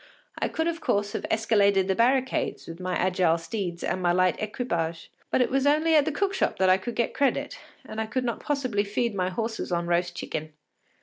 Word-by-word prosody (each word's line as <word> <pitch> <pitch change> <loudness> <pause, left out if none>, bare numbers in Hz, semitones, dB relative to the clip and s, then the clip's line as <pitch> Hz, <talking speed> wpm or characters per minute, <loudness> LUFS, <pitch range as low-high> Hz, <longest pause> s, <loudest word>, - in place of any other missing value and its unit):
I - - +1
could 320 +1 -1
of 335 -1 -2
course 205 -5 0
have - - -4
escaladed 200 -3 +3
the 190 - +2
barricades 255 +5 +1
with 165 +1 -9
my 185 0 -2
agile 180 -2 +2
steeds 175 0 -4
and 185 - -1
my 175 -1 +3
light 185 0 +3
equipage, 170 -7 -3 0.2
but - - +2
it 250 - +1
was 270 +1 +2
only 310 +3 +3
at 300 -2 +5
the - - 0
cook 395 +6 0
shop - - 0
that 190 -1 +4
I 185 - +5
could 230 +5 -5
get 235 - 0
credit, 280 -1 0 0.3
and 220 - -4
I 220 - -3
could 255 +3 -1
not 235 -2 -2
possibly 255 -8 -1
feed 215 +3 -1
my 185 -2 0
horses 225 +1 -3
on 170 -1 0
roast 175 0 0
chicken. 155 -2 -5
205 Hz, 220 wpm, -26 LUFS, 180-255 Hz, 0.3 s, at